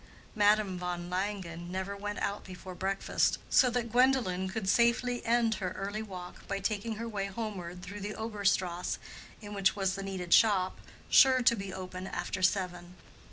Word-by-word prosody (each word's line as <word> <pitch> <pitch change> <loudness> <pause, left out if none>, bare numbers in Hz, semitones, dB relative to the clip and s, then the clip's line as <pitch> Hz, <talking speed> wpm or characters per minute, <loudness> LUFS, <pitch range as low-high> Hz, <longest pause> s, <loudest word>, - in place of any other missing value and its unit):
Madame 210 -3 +3
von 175 0 -4
Langen 180 -3 -3
never 190 +2 -3
went 205 +1 -4
out 200 +1 -2
before 185 0 -9
breakfast, 195 +2 0
so 255 - +6
that 235 -1 -2
Gwendolen 240 -7 +3
could 200 0 -4
safely 235 +3 +2
end 230 -1 +3
her 185 -1 -2
early 200 +2 -4
walk 185 -4 -9
by 200 - -1
taking 210 +2 -2
her 230 +2 -5
way 200 -3 -2
homeward 190 -4 -5
through 205 +2 -7
the 205 +1 -5
Obere 220 -2 -5
Strasse 180 -2 0 0.5
in 205 0 -7
which 195 -1 +2
was 195 -2 0
the 195 - -4
needed 190 -3 -2
shop, 195 -4 +4 0.3
sure 260 -2 +6
to 235 - +5
be 195 -2 -5
open 185 0 -6
after 185 - -3
seven. 180 -1 0
195 Hz, 170 wpm, -31 LUFS, 185-215 Hz, 0.5 s, so